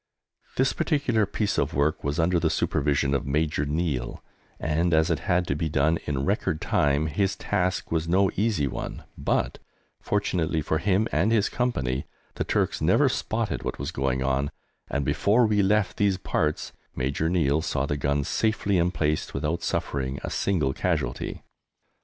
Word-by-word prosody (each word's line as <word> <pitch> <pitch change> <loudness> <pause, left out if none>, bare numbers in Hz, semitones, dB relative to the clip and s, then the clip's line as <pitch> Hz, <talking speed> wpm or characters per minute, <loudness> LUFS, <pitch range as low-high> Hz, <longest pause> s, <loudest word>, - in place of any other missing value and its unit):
This 130 +1 +3
particular 120 - +1
piece 105 0 -1
of - - -1
work 75 +3 +1
was 70 +2 -1
under 85 +1 +2
the 80 - +1
supervision 70 -2 +1
of 70 -1 -1
Major 75 0 0
Neill, 75 -5 -2 0.4
and, 80 +2 +1
as 80 +2 +3
it 80 - +1
had 90 0 +3
to 70 - -1
be 80 +1 -1
done 80 +3 +2
in 70 -2 -1
record 75 - 0
time, 70 +1 +1
his 95 +5 0
task 90 -2 -1
was 80 0 0
no 95 +3 +3
easy 105 -7 +1
one, 65 - -5
but, - - -1 0.4
fortunately 90 -6 0
for 75 +1 0
him 100 +5 +2
and 95 +9 +2
his 110 -3 +3
Company, 65 - -1 0.3
the - - -2
Turks - - 0
never - - +4
spotted - - -2
what - - -4
was 70 +4 -4
going 65 -3 -1
on, 70 +1 0 0.4
and 70 -1 -1
before 100 - +3
we 105 -2 +3
left 105 0 +2
these 100 -2 +2
parts 75 -4 -1 0.2
Major 70 +5 0
Neill 80 -4 +2
saw 70 -4 -1
the 75 - -1
guns 70 0 0
safely 105 -4 +1
emplaced 85 -3 0
without 75 +4 -1
suffering 70 -4 -2
a - - -4
single 75 -9 +1
casualty. 75 -9 -2
80 Hz, 165 wpm, -26 LUFS, 70-95 Hz, 0.4 s, never